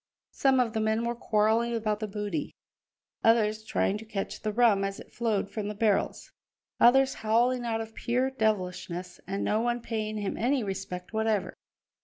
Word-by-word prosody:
Some 265 Hz, -1 st, +3 dB
of 235 Hz, -3 st, +1 dB
the 220 Hz, -, 0 dB
men 220 Hz, +1 st, +1 dB
were 235 Hz, -, 0 dB
quarrelling 230 Hz, +1 st, +1 dB
about 215 Hz, -2 st, -1 dB
the 215 Hz, -, -3 dB
booty; 210 Hz, +8 st, -4 dB, 0.7 s
others 220 Hz, -1 st, +3 dB
trying 210 Hz, -3 st, 0 dB
to 220 Hz, -, -10 dB
catch 205 Hz, -3 st, -4 dB
the 215 Hz, -, -1 dB
rum 215 Hz, -3 st, +4 dB
as 195 Hz, 0 st, -3 dB
it -, -, -13 dB
flowed 215 Hz, -4 st, -1 dB
from 210 Hz, -1 st, -3 dB
the 210 Hz, -, -4 dB
barrels; 210 Hz, -1 st, 0 dB, 0.5 s
others 265 Hz, +2 st, +6 dB
howling 240 Hz, +3 st, +2 dB
out 225 Hz, -1 st, -1 dB
of 225 Hz, 0 st, -8 dB
pure 250 Hz, +4 st, 0 dB
devilishness, 180 Hz, -6 st, -2 dB
and 195 Hz, +1 st, -2 dB
no 215 Hz, -, +1 dB
one 240 Hz, 0 st, 0 dB
paying 215 Hz, -2 st, -3 dB
him 205 Hz, -2 st, -3 dB
any 255 Hz, +2 st, +1 dB
respect 190 Hz, -1 st, -5 dB
whatever. 220 Hz, -2 st, 0 dB
220 Hz, 175 wpm, -28 LUFS, 205-235 Hz, 0.7 s, others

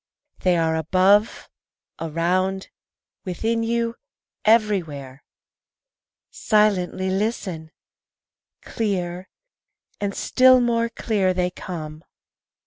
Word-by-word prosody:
They 180 Hz, -2 st, +2 dB
are 160 Hz, -1 st, +1 dB
above, 190 Hz, +7 st, +2 dB, 0.5 s
around, 180 Hz, +4 st, -1 dB, 0.5 s
within 225 Hz, +5 st, -2 dB
you, 230 Hz, 0 st, -1 dB, 0.5 s
everywhere. 170 Hz, -, +1 dB, 1.1 s
Silently 190 Hz, -3 st, +1 dB
listen! 190 Hz, -5 st, -3 dB, 0.9 s
Clear, 185 Hz, -4 st, -3 dB, 0.7 s
and 200 Hz, -1 st, -3 dB
still 255 Hz, 0 st, +5 dB
more 235 Hz, -1 st, +1 dB
clear, 200 Hz, -5 st, 0 dB
they 180 Hz, 0 st, 0 dB
come. 155 Hz, -4 st, -8 dB
190 Hz, 75 wpm, -22 LUFS, 175-220 Hz, 1.1 s, still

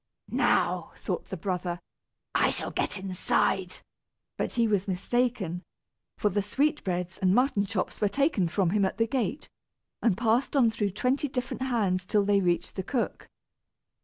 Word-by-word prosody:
"Now," -, -, +1 dB
thought -, -, -4 dB
the 190 Hz, -, -4 dB
brother, 180 Hz, -1 st, -2 dB, 0.5 s
"I -, -, +3 dB
shall -, -, 0 dB
get -, -, -1 dB
inside;" 185 Hz, 0 st, 0 dB, 0.5 s
but -, -, -2 dB
he 235 Hz, -1 st, +2 dB
was 205 Hz, -2 st, +1 dB
mistaken, 195 Hz, -2 st, 0 dB, 0.6 s
for 210 Hz, -, +2 dB
the 205 Hz, +1 st, 0 dB
sweetbreads 200 Hz, -, -1 dB
and 190 Hz, 0 st, +3 dB
mutton 245 Hz, -6 st, +2 dB
chops 185 Hz, -2 st, -3 dB
were 205 Hz, -, +3 dB
taken 275 Hz, -, +2 dB
from 175 Hz, 0 st, +1 dB
him 205 Hz, 0 st, +2 dB
at 190 Hz, -, 0 dB
the 225 Hz, -, +3 dB
gate, 250 Hz, +2 st, -2 dB, 0.5 s
and 215 Hz, -6 st, +2 dB
passed 235 Hz, +5 st, +1 dB
on 240 Hz, -5 st, +5 dB
through 210 Hz, -2 st, -1 dB
twenty 265 Hz, +7 st, +1 dB
different 250 Hz, -1 st, -4 dB
hands 200 Hz, -8 st, 0 dB
till 205 Hz, 0 st, +2 dB
they 200 Hz, -1 st, +3 dB
reached 175 Hz, -1 st, 0 dB
the 190 Hz, -, -1 dB
cook. 240 Hz, +5 st, -2 dB
205 Hz, 160 wpm, -28 LUFS, 185-245 Hz, 0.6 s, on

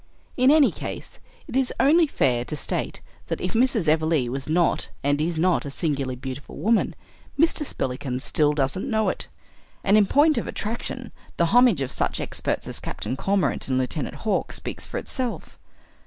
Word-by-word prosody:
In 255 Hz, +1 st, +4 dB
any 300 Hz, -1 st, +6 dB
case, -, -, -7 dB, 0.3 s
it -, -, -7 dB
is 265 Hz, -1 st, +2 dB
only 320 Hz, +4 st, +5 dB
fair 125 Hz, -, +1 dB
to 150 Hz, -, -4 dB
state 145 Hz, -, -3 dB, 0.3 s
that -, -, -2 dB
if 180 Hz, -, -3 dB
Mrs. 230 Hz, -6 st, +2 dB
Everleigh 155 Hz, -4 st, +2 dB
was 135 Hz, +2 st, -4 dB
not 170 Hz, +2 st, +1 dB
and 145 Hz, +1 st, +1 dB
is 165 Hz, +1 st, -1 dB
not 175 Hz, +2 st, +2 dB
a 140 Hz, -, -5 dB
singularly 140 Hz, -3 st, -2 dB
beautiful 130 Hz, +2 st, -7 dB
woman, 225 Hz, +1 st, +1 dB, 0.4 s
Mr. 325 Hz, 0 st, +3 dB
Spillikins 130 Hz, -, -3 dB
still 150 Hz, 0 st, +2 dB
doesn't 145 Hz, -, -1 dB
know 220 Hz, -2 st, +2 dB
it. -, -, -4 dB, 0.6 s
And 200 Hz, -, +4 dB
in 205 Hz, -, +3 dB
point 300 Hz, +5 st, +4 dB
of -, -, -5 dB
attraction 235 Hz, +2 st, -4 dB, 0.3 s
the 170 Hz, -, +3 dB
homage 245 Hz, -, +5 dB
of 130 Hz, -, -2 dB
such -, -, -1 dB
experts -, -, -2 dB
as -, -, 0 dB
Captain -, -, -4 dB
Cormorant 195 Hz, +6 st, 0 dB
and 130 Hz, -1 st, +1 dB
Lieutenant 130 Hz, +3 st, -2 dB
Hawk 220 Hz, -, -1 dB
speaks -, -, -5 dB
for -, -, -5 dB
itself. 255 Hz, -3 st, -4 dB
170 Hz, 175 wpm, -24 LUFS, -, 0.6 s, any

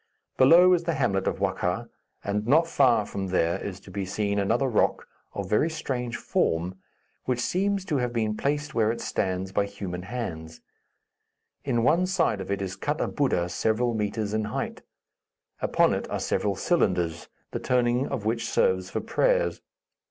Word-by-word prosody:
Below 175 Hz, +7 st, +7 dB
is 175 Hz, -1 st, +1 dB
the 170 Hz, -1 st, 0 dB
hamlet 100 Hz, -8 st, 0 dB
of -, -, 0 dB
Wakkha, 95 Hz, +3 st, -1 dB, 0.4 s
and 105 Hz, +2 st, -2 dB
not 155 Hz, +6 st, +5 dB
far 125 Hz, -9 st, +3 dB
from 95 Hz, -1 st, -4 dB
there 85 Hz, -2 st, +1 dB
is 95 Hz, -2 st, -5 dB
to 95 Hz, -, -13 dB
be 100 Hz, +1 st, -3 dB
seen 100 Hz, +2 st, -1 dB
another 115 Hz, +7 st, +1 dB
rock, 115 Hz, -5 st, +1 dB, 0.3 s
of 100 Hz, -2 st, -3 dB
very 105 Hz, -, +2 dB
strange 125 Hz, -6 st, -3 dB
form, 85 Hz, +3 st, 0 dB, 0.5 s
which 125 Hz, -1 st, 0 dB
seems 195 Hz, +7 st, 0 dB
to 150 Hz, -6 st, 0 dB
have 125 Hz, -2 st, -1 dB
been 110 Hz, -3 st, -1 dB
placed 145 Hz, +4 st, -1 dB
where 110 Hz, -3 st, +2 dB
it 115 Hz, -, -5 dB
stands 95 Hz, 0 st, -2 dB
by 100 Hz, +1 st, +1 dB
human 95 Hz, -3 st, -6 dB
hands. 90 Hz, -7 st, -6 dB, 1.0 s
In 120 Hz, -4 st, 0 dB
one 170 Hz, +8 st, +3 dB
side 170 Hz, -, +1 dB
of 95 Hz, -, -7 dB
it 100 Hz, 0 st, -1 dB
is 95 Hz, 0 st, -4 dB
cut 145 Hz, +7 st, -2 dB
a -, -, 0 dB
Buddha 130 Hz, -, 0 dB
several 110 Hz, +7 st, 0 dB
metres 105 Hz, -1 st, -2 dB
in 110 Hz, 0 st, 0 dB
height. 105 Hz, -, -4 dB, 0.8 s
Upon -, -, +3 dB
it -, -, -3 dB
are -, -, -2 dB
several 100 Hz, -1 st, 0 dB
cylinders, 90 Hz, -, 0 dB, 0.2 s
the -, -, -3 dB
turning 125 Hz, +1 st, +1 dB
of 105 Hz, -, -4 dB
which 115 Hz, +1 st, -1 dB
serves 475 Hz, -1 st, +1 dB
for -, -, -3 dB
prayers. -, -, +1 dB
110 Hz, 175 wpm, -26 LUFS, 95-140 Hz, 1.0 s, Below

